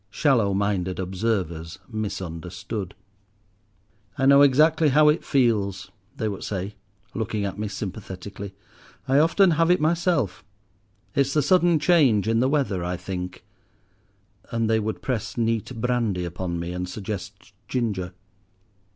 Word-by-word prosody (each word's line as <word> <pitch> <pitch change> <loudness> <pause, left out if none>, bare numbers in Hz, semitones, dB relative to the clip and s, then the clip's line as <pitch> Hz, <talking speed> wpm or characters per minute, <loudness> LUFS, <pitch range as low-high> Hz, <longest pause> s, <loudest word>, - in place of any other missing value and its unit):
Shallow 110 -4 +2
minded 95 -2 -1
observers 90 -4 -2
misunderstood. 95 -2 -5 1.2
"I 135 - +1
know 140 +1 +7
exactly 155 +3 +5
how 150 +2 +5
it 150 - +1
feels," 100 - +1 0.3
they 110 - -1
would 100 -3 -4
say, 100 0 -4 0.4
looking 110 -2 -2
at 100 +1 -5
me 105 - -2
sympathetically, 100 0 -7 0.5
"I 135 +2 +4
often 170 +4 +4
have 165 +1 +2
it 180 - +4
myself. 160 - +1 0.7
It's 140 0 +1
the 150 - +3
sudden 175 +1 +4
change 150 - +3
in 115 0 +2
the 130 +2 +2
weather, 135 - 0
I 90 +1 -2
think;" 90 0 -6 1.0
and 115 -1 0
they 110 0 +3
would 110 0 -4
press 115 -3 -3
neat 115 +1 -1
brandy 115 -7 0
upon 85 0 -4
me, 85 +1 -4
and 90 0 -4
suggest 100 +1 -7
ginger. 100 -8 -2
110 Hz, 135 wpm, -24 LUFS, 95-135 Hz, 1.2 s, know